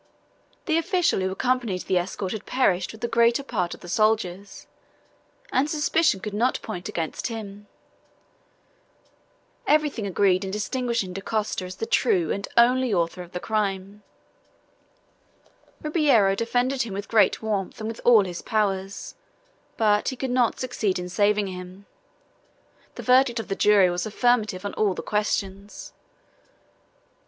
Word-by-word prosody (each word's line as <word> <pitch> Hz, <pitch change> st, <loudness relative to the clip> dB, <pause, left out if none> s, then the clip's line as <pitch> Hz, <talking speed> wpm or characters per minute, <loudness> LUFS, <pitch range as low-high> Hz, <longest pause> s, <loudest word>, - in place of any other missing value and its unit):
The 325 Hz, -2 st, +2 dB
official 355 Hz, -, +1 dB
who 190 Hz, 0 st, 0 dB
accompanied 235 Hz, -3 st, -1 dB
the 185 Hz, -, +1 dB
escort 185 Hz, +1 st, -4 dB
had 215 Hz, -, -6 dB
perished 190 Hz, -8 st, +1 dB
with 220 Hz, -, -14 dB
the 235 Hz, -, -1 dB
greater 235 Hz, +3 st, +3 dB
part 185 Hz, -10 st, -2 dB
of -, -, -20 dB
the -, -, -11 dB
soldiers, 200 Hz, -1 st, -1 dB, 0.9 s
and 280 Hz, +3 st, +1 dB
suspicion 305 Hz, -6 st, +2 dB
could 210 Hz, 0 st, -5 dB
not 235 Hz, +5 st, +1 dB
point 180 Hz, -5 st, -6 dB
against 160 Hz, -2 st, -3 dB
him. 205 Hz, -3 st, -8 dB, 2.0 s
Everything 295 Hz, -, +1 dB
agreed 190 Hz, 0 st, +2 dB
in 190 Hz, -, -4 dB
distinguishing 210 Hz, -1 st, -2 dB
Dacosta 195 Hz, 0 st, -2 dB
as 185 Hz, 0 st, -8 dB
the 225 Hz, -, -4 dB
true 180 Hz, -9 st, +1 dB
and 200 Hz, -, -3 dB
only 250 Hz, +1 st, +4 dB
author 175 Hz, -1 st, 0 dB
of 175 Hz, -1 st, -11 dB
the 180 Hz, -, -4 dB
crime. 200 Hz, -1 st, -2 dB, 1.8 s
Ribeiro 285 Hz, -, +3 dB
defended 245 Hz, +5 st, 0 dB
him 220 Hz, -5 st, -3 dB
with 200 Hz, +1 st, -5 dB
great 220 Hz, 0 st, +3 dB
warmth 205 Hz, -3 st, -2 dB
and 215 Hz, -, -4 dB
with 225 Hz, 0 st, -6 dB
all 225 Hz, -5 st, +6 dB
his 175 Hz, -2 st, -6 dB
powers, 195 Hz, -3 st, -2 dB, 0.6 s
but 210 Hz, -2 st, +2 dB
he 260 Hz, -, -5 dB
could 260 Hz, 0 st, -3 dB
not 250 Hz, -2 st, +1 dB
succeed 230 Hz, -7 st, -1 dB
in 180 Hz, 0 st, -5 dB
saving 205 Hz, +2 st, +2 dB
him. 185 Hz, +1 st, -9 dB, 1.1 s
The -, -, -7 dB
verdict 255 Hz, -1 st, +4 dB
of 225 Hz, -, -6 dB
the 195 Hz, -, -1 dB
jury 200 Hz, -4 st, +4 dB
was 175 Hz, +3 st, -2 dB
affirmative 215 Hz, -4 st, +1 dB
on 200 Hz, -, -3 dB
all 205 Hz, -4 st, +1 dB
the -, -, -6 dB
questions. 205 Hz, -1 st, -3 dB
210 Hz, 145 wpm, -24 LUFS, 190-240 Hz, 2.0 s, all